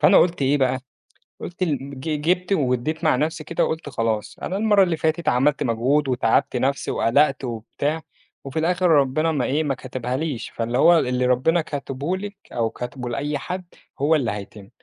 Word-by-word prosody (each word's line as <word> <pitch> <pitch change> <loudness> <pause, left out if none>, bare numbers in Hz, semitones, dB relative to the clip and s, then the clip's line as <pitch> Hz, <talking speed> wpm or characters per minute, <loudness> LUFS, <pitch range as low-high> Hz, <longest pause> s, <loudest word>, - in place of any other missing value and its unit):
فأنا - - +6
قُلت 175 -4 +2
إيه 140 +2 +3
بقى، 130 -1 +1 0.6
قُلت 175 +1 -8
ال 140 -4 -3
ج 150 +1 -2
جِبت 180 +4 +1
وادّيت 150 +1 0
مع 155 - +4
نَفسي 155 +4 -1
كده، 170 - 0
وقُلت 160 -2 -3
خلاص، 110 -4 -2
أنا 190 - -2
المرّة 205 -2 +4
اللي 175 -3 0
فاتت 160 +1 0
عملت 140 +4 +2
مجهود 130 +5 +1
وتعبت 125 -1 +1
نَفسي 135 +3 0
وقلقت 135 +3 +2
وبتاع، 130 +6 -3 0.4
وفي 135 +3 -3
الآخر 180 +3 +2
ربنا 155 +1 +3
ما 140 -5 0
إيه، 150 +4 +1
ما 140 -3 -1
كتبهاليش. 130 +1 -4
فاللي 120 +1 -2
هو 170 +4 +6
اللي 125 0 0
ربنا 130 +7 +3
كاتبه 145 +3 -3
لِك 205 +1 -7 0.2
أو 115 -1 0
كاتبه 125 +2 -6
لأي 145 +4 -2
حد 185 +5 -5 0.4
هو 150 +3 +3
اللي 125 -8 0
هيتم. 100 -1 -8
140 Hz, 180 wpm, -23 LUFS, 125-160 Hz, 0.6 s, فأنا